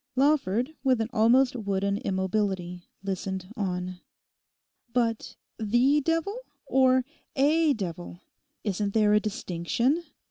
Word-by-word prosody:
Lawford, 265 -2 +2
with 260 -3 +3
an 225 0 -1
almost 245 +4 +4
wooden 200 -3 -1
immobility, 190 -2 -2
listened 190 0 -4
on. 180 -4 -3 0.9
'But 230 -2 -1 0.2
the 240 +7 +3
devil, 330 - 0 0.3
or 260 -1 +3 0.3
a 300 +2 +3
devil? 175 -5 -6 0.4
Isn't 205 0 -2
there 210 -1 +4
a 210 - +6
distinction? 215 - -1
220 Hz, 105 wpm, -27 LUFS, 190-260 Hz, 0.9 s, a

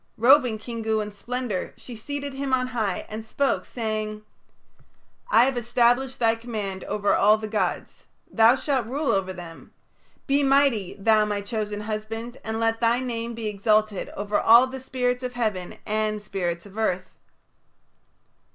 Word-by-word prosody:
Robing 250 -1 +5
Kingu 220 -1 -2
in 210 0 -4
splendour, 235 -1 -4
she 245 - -10
seated 285 +5 -5
him 270 -1 0
on 255 -1 -1
high 220 -7 -2
and 215 +1 -6
spoke, 275 +5 0
saying: 215 -2 -3 1.1
"I 250 - +6
have 265 -2 0
established 245 +2 +2
thy 225 -1 +3
command 215 -5 -5
over 205 -1 0
all 210 +2 +5
the 215 0 -5
gods. 215 0 -3 0.3
Thou 225 +2 +6
shalt 265 -4 -1
rule 280 +4 0
over 190 -1 0
them. 175 -3 -11 0.5
Be 280 0 +2
mighty, 270 -8 +2
thou 215 +1 +3
my 205 -1 -2
chosen 210 -1 -3
husband, 225 +3 -5
and 220 0 -3
let 225 0 0
thy 235 +1 +3
name 235 -2 -4
be 230 -1 -6
exalted 210 0 +1
over 205 +1 0
all 235 +3 +7
the 260 0 -7
spirits 250 -1 -1
of 250 -1 -4
heaven 215 -7 -2
and 215 0 -1
spirits 175 -4 -3
of 200 +2 -9
earth." 185 -4 -1
225 Hz, 155 wpm, -25 LUFS, 210-250 Hz, 1.1 s, all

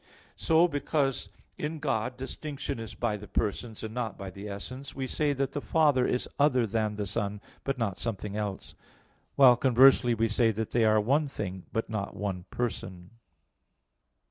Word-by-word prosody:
So, 165 +2 +4
because 145 -3 -1 0.3
in 155 +2 -3
God 125 -5 -1
distinction 140 0 -5
is 115 -1 -7
by 110 -3 -1
the 105 +1 -10
persons, 110 +1 -2
and 110 0 -5
not 120 -3 -3
by 95 -1 -7
the 100 +3 -8
essence, 130 +7 -7
we 135 -1 -2
say 145 +3 0
that 135 0 -1
the 145 - -3
Father 145 -6 +3
is 125 - -1
other 130 -4 +4
than 110 0 -1
the 105 0 -3
Son, 100 +1 -2 0.2
but 135 -1 -1
not 105 -6 -2
something 105 -3 -4
else; 105 -2 -4 0.6
while 130 -3 +8
conversely 125 -1 +5
we 115 +1 +2
say 115 +1 +3
that 110 +1 -3
they 115 -2 +3
are 110 0 +5
one 140 +8 +2
thing, 95 -8 -5
but 115 -1 -1
not 105 -3 -4
one 95 -3 -3
person. 95 -6 -4
115 Hz, 170 wpm, -29 LUFS, 105-135 Hz, 0.6 s, while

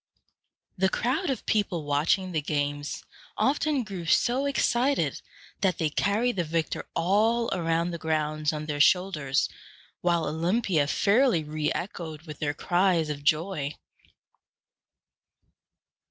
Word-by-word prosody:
] - - -53 0.3
The 190 0 +3
crowd 265 - -1
of 265 - -3
people 190 -6 0
watching 155 +6 +1
the 160 -3 0
games 145 0 -2 0.3
often 290 0 +1
grew 190 -6 -7
so 255 - +2
excited 275 0 +1 0.4
that 185 -4 +1
they 155 -2 0
carried 215 +7 +1
the 175 - +1
victor 160 0 -2
all 220 +7 +2
around 165 0 0
the 170 - -5
grounds 155 -1 0
on 155 -1 -4
their 145 -1 -1
shoulders, 155 -6 +2 0.5
while 170 -2 +1
Olympia 165 0 +1
fairly 210 - +3
re 150 0 -2
echoed 160 -4 -6
with 150 -4 -9
their 145 -1 -1
cries 175 -3 +1
of 145 -1 -6
joy. 155 -1 0
170 Hz, 125 wpm, -27 LUFS, 155-205 Hz, 0.5 s, The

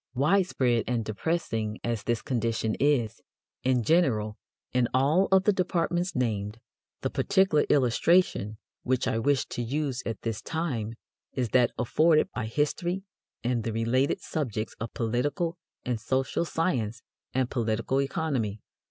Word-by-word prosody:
Widespread 135 - +2
and 120 -2 0
depressing 110 -3 -2
as 115 -3 -1
this 120 -1 -1
condition 115 -4 0
is, 135 -7 +1 0.4
in 125 -2 +2
general, 110 -9 +2 0.4
in 125 -1 +3
all 150 +9 +4
of 190 0 +5
the 210 - +4
departments 175 0 0
named, 110 -4 -1 0.4
the - - 0
particular 190 -6 +3
illustration 125 - +3 0.2
which 130 0 0
I 115 - +1
wish 140 +2 +2
to - - -3
use 130 +1 -2
at 115 -3 -4
this 115 -2 -2
time 125 -10 -3 0.4
is 125 -3 -1
that 125 0 +4
afforded 155 +6 +3
by 110 -3 -3
history 175 +9 -1 0.4
and 120 -1 0
the 115 - -2
related 115 +5 +1
subjects 115 -8 -3
of 115 0 -4
political 145 - -1 0.3
and 125 -3 -1
social 130 +7 0
science 125 - -1 0.3
and 130 -2 +1
political 115 +2 0
economy. 135 -8 -1
125 Hz, 135 wpm, -28 LUFS, 115-155 Hz, 0.4 s, of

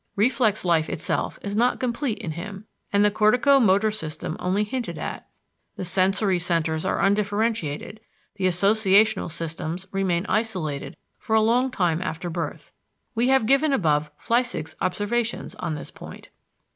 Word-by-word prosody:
Reflex 220 -2 +2
life 165 -3 +2
itself 160 - -2
is 200 0 -3
not 240 +3 +2
complete 250 -1 -1
in 195 -8 -5
him, 195 +5 -7 0.3
and 205 0 +4
the 210 - +4
cortico 245 +6 +4
motor 205 +1 +3
system 160 -6 -5
only 190 +3 +1
hinted 240 +3 -4
at; - - -6 0.5
the 185 - -5
sensory 190 +1 +2
centers 165 -2 0
are - - 0
undifferentiated, 205 -3 0 0.4
the 190 - -1
associational 200 +1 +3
systems 165 +2 -4
remain 190 -2 0
isolated 160 -11 -2 0.2
for 220 - -1
a - - +6
long 245 +4 +3
time 175 -8 0
after 175 -1 -4
birth. - - -5 0.4
We 240 +1 +1
have 265 -3 +4
given 275 +4 +3
above 150 - +1
Flechsig's 235 -10 -1
observation 220 +5 -1
on 155 - -2
this 150 - -8
point. - - -11
200 Hz, 145 wpm, -24 LUFS, 170-225 Hz, 0.5 s, a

